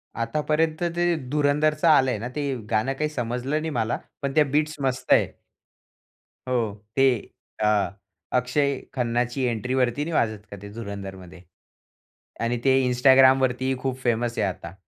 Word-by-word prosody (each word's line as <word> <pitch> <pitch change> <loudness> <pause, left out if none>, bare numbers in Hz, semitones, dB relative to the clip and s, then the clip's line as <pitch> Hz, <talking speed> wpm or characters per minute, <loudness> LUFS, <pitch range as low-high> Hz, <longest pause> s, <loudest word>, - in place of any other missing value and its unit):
आतापर्यंत 155 +7 0
ते 175 0 +1 0.2
धुरंधरचा 150 +2 +2
आलंय 130 -3 +2
ना, 115 - -4
ते 145 -1 -1 0.3
गाणं 115 +5 +1
काही 150 +3 -2
समजलं 125 +2 -2
नाही 160 - -3
मला, 110 +1 0 0.2
पण 140 -1 -2
त्या 155 - +6
बीट्स 155 +2 +1
मस्त 130 -1 -2
आहे. - - +4 1.2
हो, 110 -5 -1
ते 135 - +4 0.6
अ, 105 -1 +2 0.5
अक्षय 140 +3 +1 0.2
खन्नाची 120 0 -1
एंट्रीवरती 125 +2 0
नाही 165 - -4
वाजत 110 -7 0
का 100 - -7
ते 100 - -9
धुरंधरमध्ये. 95 -5 -8 1.0
आणि 115 +1 0
ते 135 -1 +5
Instagramवरती 130 0 +5
ही 130 0 0
खूप 130 0 -2
फेमस 120 -1 0
आहे 105 - +1
आता. 85 -2 -6
125 Hz, 140 wpm, -24 LUFS, 115-145 Hz, 1.2 s, त्या